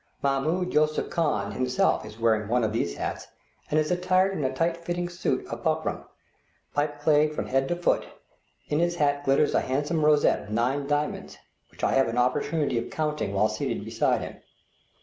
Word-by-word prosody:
Mahmoud 155 +7 0
Yusupli 155 0 +1
Khan 125 -12 0
himself 125 +3 +1
is 110 - -12
wearing 110 -2 +2
one 120 +2 +1
of 110 -1 0
these 110 - -1
hats, - - -4 0.4
and 155 - +2
is 155 +2 0
attired 185 +2 +2
in 150 - -2
a 130 - 0
tight 165 +5 0
fitting 175 +1 -3
suit 175 +1 -2
of - - -6
buckram, - - -1 0.7
pipe 145 0 -1
clayed 150 0 +3
from - - -2
head 135 +1 +1
to 175 - 0
foot; 175 - 0 0.6
in 150 - 0
his 175 0 +1
hat 145 -3 +1
glitters 140 +2 +3
a - - +3
handsome 145 +4 -1
rosette 150 -1 +4
of - - -13
nine 125 +6 0
diamonds, 145 +1 -2 0.3
which - - -14
I - - +3
have 135 -2 +3
an 115 +1 -3
opportunity 140 +2 +1
of 115 - -6
counting 150 -9 -2
while 105 +2 +4
seated 110 - -3
beside - - +1
him. - - -7
145 Hz, 190 wpm, -26 LUFS, 125-160 Hz, 0.7 s, rosette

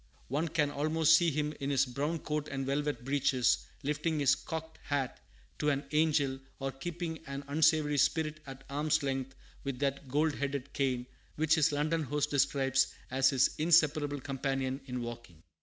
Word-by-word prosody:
One 150 +6 0
can 150 -2 +1
almost 155 +2 +4
see 170 +1 +4
him 150 0 -1
in 140 - -2
his 135 -1 +3
"brown 145 +6 -2
coat 150 -1 -3
and 135 -1 -3
velvet 145 -1 -1
breeches," 135 -3 +2 0.2
lifting 150 +2 -1
his 140 -1 +5
"cocked 160 +1 -6
hat" 140 -3 -2 0.4
to 150 - +2
an 140 0 0
angel, 150 -4 +2 0.2
or 135 0 -3
keeping 165 +3 -5
an 140 +1 -5
unsavory 150 0 +3
spirit 155 +2 +1
at 135 0 -9
arm's 150 +2 0
length 135 -1 -2 0.3
with 140 -2 -3
that 140 0 -2
"gold 150 +4 +1
headed 140 -1 -3
cane" 130 -3 0 0.3
which 160 0 +2
his 160 -1 +4
London 155 +3 0
host 150 0 -1
describes 135 -1 +2 0.2
as 130 0 +4
his 130 -2 +3
inseparable 150 -3 +3
companion 135 0 -2
in 125 -1 -3
walking. 120 -9 -9
145 Hz, 165 wpm, -32 LUFS, 135-155 Hz, 0.4 s, his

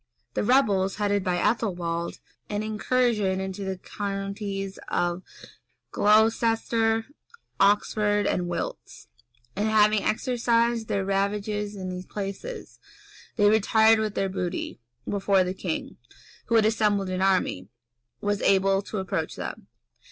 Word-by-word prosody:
The - - -1
rebels, 205 -6 +3
headed 205 -1 0
by 180 -1 0
Ethelwald, 175 -5 -1 0.3
made 210 - -3
an 205 - -1
incursion 215 -2 +1
into 190 +1 -4
the 190 -1 -3
counties 195 0 -4
of 175 +1 -1 0.7
Glocester, 225 +1 +2 0.5
Oxford, 205 +1 +2
and 180 -1 0
Wilts; 170 -1 -5 0.5
and 210 - 0
having 215 -1 +4
exercised 235 -1 +1
their 195 -1 -1
ravages 205 +1 -1
in 185 -2 -5
these 180 0 -6
places, 210 - -6 0.6
they 205 -3 +4
retired 220 +1 +4
with 215 -1 -2
their 195 - 0
booty, 180 -8 -4 0.3
before 195 -1 +2
the 180 0 -3
king, 185 -3 -4 0.5
who 230 - +1
had 220 -1 +5
assembled 210 -3 +1
an 185 0 -2
army, 185 - +1 0.5
was 205 0 -1
able 195 0 +3
to 210 - -6
approach 190 -2 -2
them. - - -7
205 Hz, 125 wpm, -26 LUFS, 190-220 Hz, 0.7 s, had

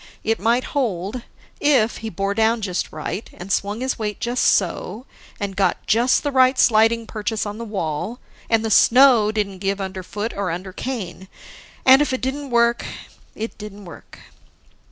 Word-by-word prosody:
It 225 +1 0
might 235 +4 +2
hold, 225 -4 -2 0.4
if 260 -6 +3
he 225 - -5
bore 195 +1 -2
down 225 +2 +2
just 185 -3 -2
right, 210 - -5
and 180 +3 -8
swung 205 +4 -1
his 260 -1 -2
weight 210 -2 -3
just 240 +1 -1
so, 200 +5 0 0.3
and 200 -1 -4
got 190 -2 0
just 235 +4 +3
the 290 - -1
right 260 0 +4
sliding 225 0 +4
purchase 215 0 -3
on 205 +1 -6
the - - -4
wall, 190 - -3 0.3
and 225 -1 +2
the 220 - -1
snow 240 -2 +6
didn't 200 -3 -2
give 195 +1 -1
underfoot 195 +3 -5
or 200 -1 -2
undercane. 190 +2 -5 0.6
And 265 +2 +8
if 295 - 0
it 260 - -2
didn't 275 +2 -3
work 235 -1 +2 0.5
it 225 +2 -5
didn't 205 -1 -9
work. 170 - -13
220 Hz, 165 wpm, -21 LUFS, 195-240 Hz, 0.6 s, And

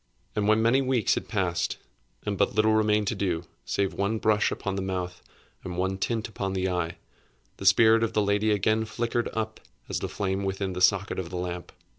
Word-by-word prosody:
And 105 -1 +1
when 110 +1 +4
many 125 +4 +4
weeks 130 -4 +2
had - - -3
passed, 85 -5 -1 0.5
and 105 -1 -1
but 100 - +1
little 110 0 +4
remained 105 -1 +3
to - - -1
do, 90 -4 -1 0.2
save 100 -1 0
one 100 +3 0
brush 105 -1 +2
upon 100 -1 -3
the 95 - -2
mouth 90 -1 -3 0.4
and 90 -1 -5
one 95 +1 -1
tint 110 +1 -1
upon 95 -3 -3
the 95 0 0
eye, 90 -1 -2 0.6
the 95 - -2
spirit 110 +3 +6
of 115 - -1
the 105 - +2
lady 100 +2 +2
again 110 +2 +2
flickered 120 +2 -1
up 110 -1 -3 0.3
as - - -2
the - - -3
flame 95 -1 -2
within 95 0 -2
the 90 - -4
socket 95 +1 +3
of 90 -3 -4
the 90 - -5
lamp. 90 0 -4
100 Hz, 205 wpm, -27 LUFS, 95-110 Hz, 0.6 s, spirit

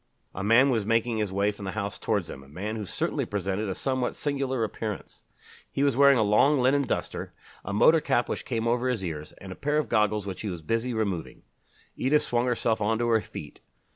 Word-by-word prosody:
A 100 - -5
man 120 +6 +5
was 115 -4 +1
making 115 +2 +1
his 105 -3 -1
way 100 +2 +1
from 100 -1 -9
the 95 - -4
house 100 -1 -4
towards 100 -6 0
them, 70 - -8
a 70 - -16
man 100 +9 -5
who 105 -3 -5
certainly - - -1
presented 100 +2 -2
a 95 - -2
somewhat 130 -2 -1
singular 135 -4 -1
appearance. 110 -1 -5 0.5
He 140 - 0
was 140 -3 +3
wearing 140 0 +6
a 110 - +3
long 130 +8 +4
linen 135 +2 +3
duster, - - -3 0.3
a 100 - -5
motor 155 +10 +5
cap 120 -4 +1
which - - -3
came 115 -3 -2
over 120 +2 +1
his 110 -7 -1
ears, 75 -3 -5
and 95 - -11
a - - -6
pair 150 +1 0
of 155 - 0
goggles 105 -1 +2
which 95 -2 -5
he 105 - -3
was 85 -4 -6
busy 115 +8 -1
removing. 100 -7 -3 0.5
Edith 150 +3 +2
swung 120 -3 0
herself 115 -2 0
on 110 +2 +1
to 120 +1 0
her 110 -1 +3
feet. 75 - -9
110 Hz, 225 wpm, -27 LUFS, 100-125 Hz, 0.5 s, wearing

